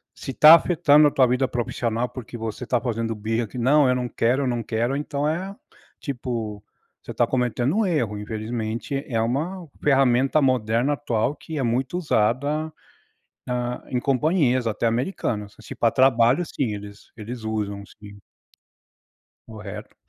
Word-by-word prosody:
se 135 - -6
tá 155 +5 +9
afetando 150 -3 +4
a - - 0
tua 130 -2 +4
vida 125 +2 +1
profissional, 120 0 -2
porque 120 -1 -8
você 115 +2 -5
tá 125 -2 +1
fazendo 115 -2 -2
birra 110 +2 -2
que 125 - -10
"não, 135 +3 +4
eu - - +4
não 125 -1 -2
quero, 130 +4 +1
não 120 -2 -1
quero", 120 +4 -1
então 145 0 -2
é, 190 +5 -3 0.4
tipo, 115 -6 -4 0.4
você - - -7
tá - - +2
cometendo 125 - 0
um 220 - +2
erro, 120 - -1
infelizmente 110 +5 -4
é 115 -4 0
uma 160 +9 -2 0.2
ferramenta 135 +1 +3
moderna 125 +1 +1
atual 125 0 -1
que 160 -2 -8
é - - 0
muito 125 +8 -1
usada, 150 +2 0 0.7
hã, 125 0 -2
em 125 - 0
companhias 130 -2 +1
até 110 +2 -1
americanos, 115 - -2
se - - -9
para 115 - +2
trabalho 130 +3 +4
sim 125 -7 -2
eles 100 0 -11
eles 115 +2 -7
usam 105 -2 -3
sim. 100 -1 -14 1.3
Correto. 105 -1 -9
125 Hz, 150 wpm, -23 LUFS, 115-140 Hz, 1.3 s, tá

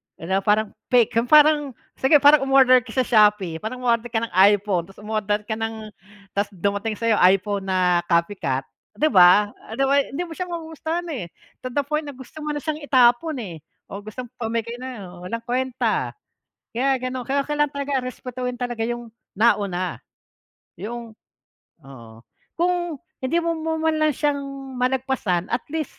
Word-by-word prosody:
yung 190 +4 -1
parang 210 +1 +1 0.2
fake 245 -3 +3
kung 230 +2 0
parang 295 -2 +5 0.2
sige 265 +3 +4
parang, 290 -1 +6
um-order 260 -1 +6
ka 225 -2 -12
sa 260 - +3
Shopee 210 -7 +3
parang, 250 +5 -6
um-order 235 -1 +1
ka 230 -1 -1
ng 230 - -4 0.2
iPhone 200 -4 +1
tapos 195 +2 -15
um-order 210 -1 -1
ka 215 - -8
ng 220 -1 -5 0.4
tapos 200 +1 0
dumating 200 +4 -1
sa'yo 230 -1 +1
iPhone 195 +1 +1
na 180 -2 +2
copycat, 170 -6 0 0.3
'di 310 0 +1
ba? 190 +3 +6 0.2
Ah, 220 - -7
'di 270 - +1
ba, 280 +1 +4
hindi 280 +4 -3
mo 340 - -10
siya 360 +2 -4
magugustahan, 325 0 -4
eh, 240 - -4 0.3
to 255 - -6
the 280 +3 -1
point 300 +2 -2
na 285 - -7
gusto 260 +4 -12
mo 300 -1 -3
na 290 - -5
siyang 310 -1 -2
itapon, 260 +4 +4
eh, 170 -6 -8 0.3
o 200 - -5
gusto 215 +5 -8
mo 245 - -13
pamigay 230 +1 -3
nalang, 205 -9 -8
walang 230 +3 -4
kuwenta. 255 +1 -1 0.6
Kaya 265 +2 +1
gano'n 255 0 -4
kaya 275 +3 0
kailangan 295 -1 0
talaga 280 -2 -2
respetuhin 250 0 -5
talaga 240 -2 -3
yung 240 0 -4 0.2
nauna, 195 -5 +1 0.8
yung 225 +4 -7 0.7
oo. 115 -4 -13 0.3
Kung 345 -3 -1 0.2
hindi 315 +6 0
mo 335 - 0
mo 320 0 -2
man 320 -1 +1
lang 310 -2 +2
siyang 290 0 0 0.4
malagpasan 250 -8 -1
at - - -2
least 315 -2 -4
240 Hz, 170 wpm, -23 LUFS, 205-280 Hz, 0.8 s, parang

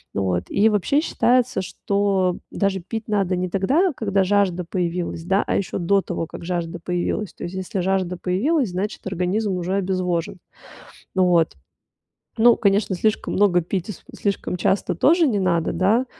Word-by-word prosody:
Вот, 90 -2 0
и 205 +3 +3
вообще, 215 +8 +2
считается, 250 - +1
что 195 -1 0
даже 195 -2 -1
пить 220 +5 -6
надо 195 -4 +1
не 180 0 -2
тогда, 275 - +2
когда 200 -4 +1
жажда 190 -2 +1
появилась, 175 -2 -3
да, 195 +3 +2
а - - -1
еще 195 - -2
до 195 +2 +2
того, 175 -3 -4
как 165 - -10
жажда 170 -1 -3
появилась. 180 +4 -2
То - - -9
есть 175 +2 -5
если 190 0 -3
жажда 185 -1 0
появилась, 235 - 0
значит, 195 +4 -4
организм 190 +2 -1
уже 180 +2 -2
обезвожен. 185 -2 -1 0.7
Вот. 180 -3 +3 0.8
Ну, 235 +1 +6
конечно, 200 -2 +2
слишком 215 +4 0
много 185 -3 +4
пить, 180 +2 -3
и 210 - -3
с - - -16 0.2
слишком 200 -2 -2
часто 190 0 0
тоже 325 - +4
не 215 -6 +1
надо, 170 -3 +1
да, 220 +7 +2
190 Hz, 165 wpm, -22 LUFS, 180-205 Hz, 0.8 s, Ну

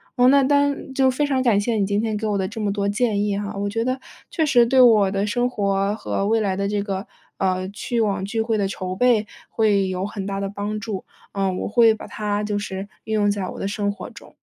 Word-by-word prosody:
嗯 250 -1 +5
那 280 0 +5
当 285 0 +1
就 265 0 +3
非 275 +3 0
常 270 -2 +1
感 230 -6 +3
谢 230 +3 -1
你 200 -3 +1
今 205 0 0
天 220 -1 -1
给 215 +1 -2
我 205 -1 0
的 190 -1 -1
这 220 +2 -6
么 205 -1 0
多 200 0 -1
建 210 -1 +1
议 205 -1 0
哈， 205 0 -4
我 200 - -1
觉 225 +2 -1
得 255 +1 -1 0.3
确 320 -3 0
实 245 -5 +5
对 260 +2 +3
我 215 -5 +6
的 200 0 0
生 245 +4 0
活 200 -2 0
和 200 -2 -2
未 225 +1 +2
来 200 -3 0
的 200 +1 -1
这 205 -1 -1
个， 195 -1 -4 0.3
呃， 185 -1 0
去 235 +4 -3
网 200 -3 0
聚 220 +3 -3
会 225 0 0
的 200 - +1
筹 185 -1 -4
备， 235 -2 +3 0.2
会 205 -4 +2
有 185 0 -2
很 200 -1 -5
大 195 0 -3
的 200 - -2
帮 205 +1 -4
助， 210 -3 -5 0.3
呃， 195 -1 0
我 185 - -3
会 225 0 +5
把 - - -9
它 210 -1 -2
就 210 -1 -1
是 195 0 -5 0.2
运 220 - -1
用 205 -1 +3
在 200 -2 -3
我 - - -8
的 - - -2
生 205 0 -1
活 200 - -8
中。 - - -15
205 Hz, 275 characters per minute, -22 LUFS, 200-230 Hz, 0.3 s, 我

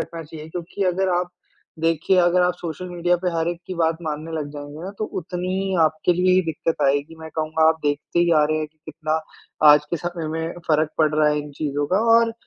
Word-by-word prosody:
रखना 165 -1 -5
चाहिए 155 0 -10
क्योंकि 180 +4 -4
अगर 190 +1 0
आप 180 0 -2 0.5
देखिए 165 +3 +2
अगर 175 +1 +4
आप 180 0 +2
सोशल 175 +1 -6
मीडिया 175 0 +1
पे 180 - +2
हर 165 0 0
एक 175 0 -4
की 185 - -5
बात 165 -1 +1
मानने 155 +1 -4
लग 150 -2 -3
जाएँगे 145 +2 -8
ना 195 - -5
तो 215 - -1 0.2
उतनी 180 +1 -4
ही 190 -1 -1
आपके 155 +3 +1
लिए 180 +1 +3
ही 185 - +4
दिक्कत 165 +2 -2
आएगी। 145 +3 0
मैं 160 0 -8
कहूँगा 160 0 +2
आप 160 0 +2
देखते 145 +3 -1
ही 175 0 +3
आ - - +4
रहे 155 +1 0
हैं 155 - -2
कि, 155 0 -43
कितना 155 0 -2 0.5
आज 150 0 +4
के 170 - 0
समय 175 -1 -4
में 160 +1 -3
फ़र्क 155 0 +2
पड़ 155 -1 +3
रहा 155 0 +4
है 150 0 +1
इन 145 - -9
चीज़ों 145 0 -2
का 185 +5 +2 0.2
और 230 0 +3
160 Hz, 235 wpm, -22 LUFS, 155-175 Hz, 0.5 s, अगर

